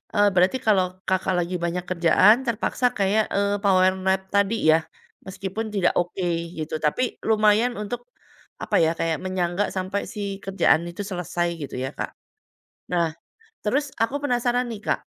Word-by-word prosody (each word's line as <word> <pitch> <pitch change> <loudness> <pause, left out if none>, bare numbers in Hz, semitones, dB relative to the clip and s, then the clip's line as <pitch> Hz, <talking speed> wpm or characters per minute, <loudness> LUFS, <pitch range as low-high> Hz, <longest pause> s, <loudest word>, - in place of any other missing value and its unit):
eee, 205 0 +5
berarti 185 +8 +3
kalau 195 -4 +4 0.2
Kakak 190 0 +1
lagi 175 +1 -2
banyak 175 +1 -2
kerjaan 185 +4 +5
terpaksa 235 +2 -1
kayak, 205 +2 +2
eee, 200 0 +1
power 185 -1 +4
nap 190 0 +1
tadi 200 +2 +3 0.2
ya? 160 - +5 0.5
Meskipun 195 +3 -4
tidak 180 -3 +2
oke, 175 +1 -2 0.3
gitu. 155 0 -5
Tapi 195 +11 0
lumayan 215 +2 +3
untuk 240 +4 -5 0.6
apa - - -1
ya, 160 0 +3
kayak 165 -2 0
menyangga 185 +1 -1
sampai 190 +2 -2
si 200 -1 -5
kerjaan 190 -4 +3
itu 175 +4 -6
selesai, 175 -2 -2
gitu 140 - -6
ya 130 +2 -3
Kak. - - -5 0.8
Nah, 165 -3 +1 0.5
terus 275 +6 0
aku 230 +5 +1
penasaran 245 -2 +1
nih 215 -3 -6
Kak, - - +1
195 Hz, 155 wpm, -24 LUFS, 175-215 Hz, 0.8 s, eee